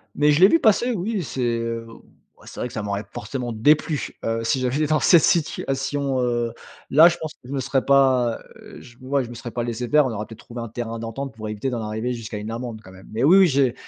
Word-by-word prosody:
mais 150 +1 +4
je 150 - +2
l'ai 190 - +9
vu 330 - +4
passer 235 +3 +3
oui, 205 -2 -2
c'est, 130 0 -5
heu, 115 -1 -2
o 115 - -14 0.4
ouais - - -18
c'est - - -10
vrai - - -2
que - - -13
ça 110 - -3
m'aurait 100 0 -3
forcément 120 +2 -5
déplu, 150 +5 +1
heu, 115 0 -1
si 130 +3 +1
j'avais 130 +5 0
dans 155 0 +2
cette 170 -3 +6
situation, 140 -3 0
heu, 120 -1 0 0.4
là, 155 +5 +8
je 175 - +2
pense 155 -1 -6
que - - -39
je 135 - -6
me 135 - -1
serais 130 +1 -1
pas, 130 -4 +3 0.2
heu, - - -13
je 120 -1 -16
ouais, 135 +1 -1
je 120 - -9
me 120 - -9
serais 120 0 -7
pas 120 - -3
laissé 120 +1 -4
faire 150 +1 +4
on 130 - -2
aurait 105 -1 -4
peut-être 115 0 -13
trouvé 120 0 -9
un 115 - -5
terrain 115 0 -5
d'entente 115 +4 -5
pour 110 -1 -7
éviter 105 +5 -3
d'en 120 -3 -3
arriver 110 +3 -3
jusqu'à 115 -2 -7
une 105 +2 -6
amende 115 -2 -6
quand 95 - -13
même! 95 0 -15
Mais 115 +4 -1
oui, 175 +7 +7
oui, 190 - +7
j'ai 135 -5 +2
125 Hz, 265 wpm, -23 LUFS, 115-145 Hz, 0.4 s, l'ai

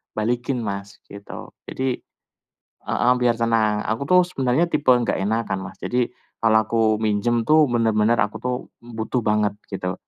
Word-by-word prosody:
balikin 120 +3 -1
Mas, 100 -1 -5 0.2
gitu. 100 0 -9 0.2
Jadi 130 -1 -2 0.8
heeh 125 - +1
biar 120 -2 +2
tenang. 110 -2 +1
Aku 115 +6 -2
tuh 180 0 +6
sebenarnya 135 -2 +1
tipe 145 -5 -1
enggak 120 -5 +3
enakan 100 -2 -2
Mas. - - -17
Jadi, 125 -1 -1 0.3
kalau 110 -1 +4
aku 115 +1 -1 0.2
minjem 115 +2 +1
tuh 155 -1 +5
bener-bener 115 -1 +2
aku 110 -1 -1
tuh 125 0 -1 0.3
butuh 115 +1 -3
banget, 105 -1 +1 0.2
gitu. 90 -1 -3
115 Hz, 150 wpm, -22 LUFS, 105-125 Hz, 0.8 s, tuh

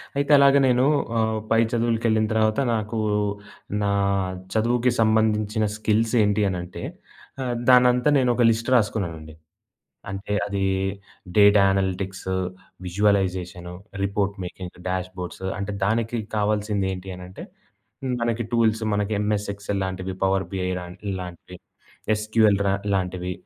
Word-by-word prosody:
అయితే 140 +1 0
అలాగ 140 0 +6
నేను 125 0 +3 0.3
ఆహ్, 110 -1 +1
పై 115 - +5
చదువులకెళ్ళిన 115 -2 +1
తర్వాత 110 +1 +2
నాకు 110 0 -2 0.9
నా 100 - +1 0.6
చదువుకి 120 +3 +2
సంబంధించిన 110 0 +2
స్కిల్స్ 110 +2 +1
ఏంటి 105 +1 +1
అని 90 - -2
అంటే? 90 0 -8 0.6
ఆహ్, 125 -1 -2
దాన్నంతా 125 +1 +5
నేను 125 -2 +2
ఒక 125 - +2
లిస్ట్ 115 +2 -2
రాసుకున్నానండి. 85 -9 -1 0.8
అంటే 100 +1 -5
అది 100 -1 -2 0.7
data 100 0 +7
analytics, 95 0 -2 0.5
visualisation, 90 -2 0 0.3
report 100 0 -1
making, 90 0 -8
dashboards 95 0 -5
అంటే 100 +1 -3
దానికి 115 +3 0 0.2
కావాల్సింది 105 -1 0
ఏంటి 95 +1 -7
అనంటే, 90 +1 -10 0.8
మనకి 115 0 0
టూల్స్ 115 -1 +2
మనకి 105 +1 0
ఎంఎస్ 105 -1 -1
ఎక్స్‌ఎల్ 100 0 -3
లాంటివి, 95 0 -4
పవర్ 95 0 +2
బీఐ 95 -1 -2
లాం 90 0 -8 0.2
ఇలాంటివి, 90 -1 -7 0.6
ఎస్‌క్యూ‌ఎల్ 105 -1 +2
రా 95 - +2 0.2
లాంటివి, 90 -1 -2
105 Hz, 120 wpm, -24 LUFS, 95-110 Hz, 0.9 s, data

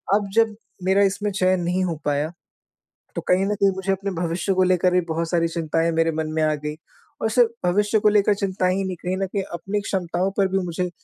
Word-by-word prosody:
अब 205 -1 0
जब 225 -2 +3 0.3
मेरा 190 +2 +3
इसमें 200 +1 0
चयन 185 -2 +1
नहीं 180 +2 0
हो 170 -2 -2
पाया 145 +2 0 0.8
तो - - -2
कहीं 185 +2 +3
न 210 - 0
कहीं 200 0 +3
मुझे 190 0 -1
अपने 195 +1 -2
भविष्य 175 +2 -1
को 185 0 +3
लेकर 180 0 +3
भी 180 - +4
बहुत 165 +1 -1
सारी 170 -1 +2
चिंताएँ 165 0 0
मेरे 165 0 +2
मन 155 0 -2
में 160 - 0
आ 155 0 +2
गई। 150 +1 -5 0.5
और 220 - +1
सिर्फ़ 235 0 +4 0.2
भविष्य 205 +4 +2
को 210 - +4
लेकर 205 0 +4
चिंताएँ 185 -2 0
ही 195 - -1
नहीं 185 -1 -3
कहीं 185 +1 -1
न 195 - 0
कहीं 195 0 -2
अपनी 195 +4 -2
क्षमताओं 185 -1 -1
पर 195 -1 +3
भी 195 - 0
मुझे 180 +1 -2
185 Hz, 230 wpm, -23 LUFS, 170-200 Hz, 0.8 s, भी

